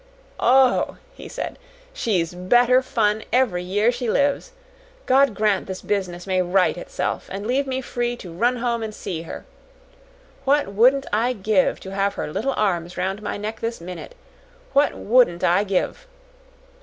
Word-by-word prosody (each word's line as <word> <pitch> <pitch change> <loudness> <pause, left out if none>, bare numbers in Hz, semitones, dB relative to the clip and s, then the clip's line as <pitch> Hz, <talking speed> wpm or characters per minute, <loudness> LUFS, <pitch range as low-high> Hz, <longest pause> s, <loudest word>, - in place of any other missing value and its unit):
"Oh," 260 +1 +3 0.2
he - - -11
said, - - -5 0.3
"she's 185 - -1
better 240 +8 +4
fun 220 -4 0
every 240 -8 +2
year 205 +6 +1
she 245 -1 -3
lives. 280 - +1 0.5
God 265 -3 +4
grant 210 -1 +1
this 190 -1 -6
business 180 -4 -2
may 185 -1 +1
right 180 +1 +2
itself 175 - -4
and 200 +2 -5
leave 265 +4 0
me 260 0 -2
free 240 -1 -2
to 180 -7 -10
run 240 +8 +1
home 235 -1 -1
and 215 -1 -5
see 165 -4 -5
her. 165 - -8 1.0
What 285 -5 +2
wouldn't 255 +7 +4
I 235 +4 +2
give 205 -3 +1
to 190 - -8
have 195 0 0
her 150 - -4
little 275 - -1
arms 175 -4 -1
round 190 +3 -2
my 210 - -4
neck 215 +2 -5
this 230 +1 -3
minute! 180 - -8 0.6
What 285 +1 +3
WOULDN'T 210 -7 +3
I 180 +3 +3
give!" 200 - -2
215 Hz, 160 wpm, -22 LUFS, 185-250 Hz, 1.0 s, better